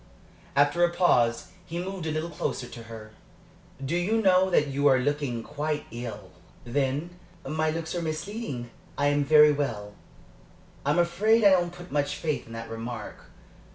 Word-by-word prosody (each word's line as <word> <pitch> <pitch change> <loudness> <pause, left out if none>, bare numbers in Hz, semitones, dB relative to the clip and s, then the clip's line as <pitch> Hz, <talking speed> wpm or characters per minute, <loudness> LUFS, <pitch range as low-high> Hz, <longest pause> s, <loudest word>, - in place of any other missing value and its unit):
After 145 +5 +3
a 175 - +5
pause 145 -10 +2
he 170 -1 -6
moved 180 -1 -4
a - - -1
little 155 +2 -3
closer 140 -4 -3
to 115 - -10
her. 110 -1 -10 0.7
"Do 150 +6 -1
you 195 +6 +1
know 190 -2 +4
that 160 -4 +3
you 140 0 +1
are 135 -2 +6
looking 130 -3 -1
quite 150 +2 -3
ill?" 110 -5 -7 0.3
"Then 140 +6 -1 0.4
my 155 +2 0
looks 160 0 -3
are 175 - -2
misleading. 155 - -4 0.3
I 145 0 +3
am 145 0 +2
very 150 +1 +7
well." 115 -8 -3 0.9
"I - - +3
am 150 - +2
afraid 205 +7 +3
I 200 - +7
don't 175 -2 +3
put 175 0 -12
much 145 0 0
faith 155 -4 -3
in 115 - -10
that 115 0 -6
remark. 115 +2 -7
150 Hz, 170 wpm, -27 LUFS, 125-175 Hz, 0.9 s, very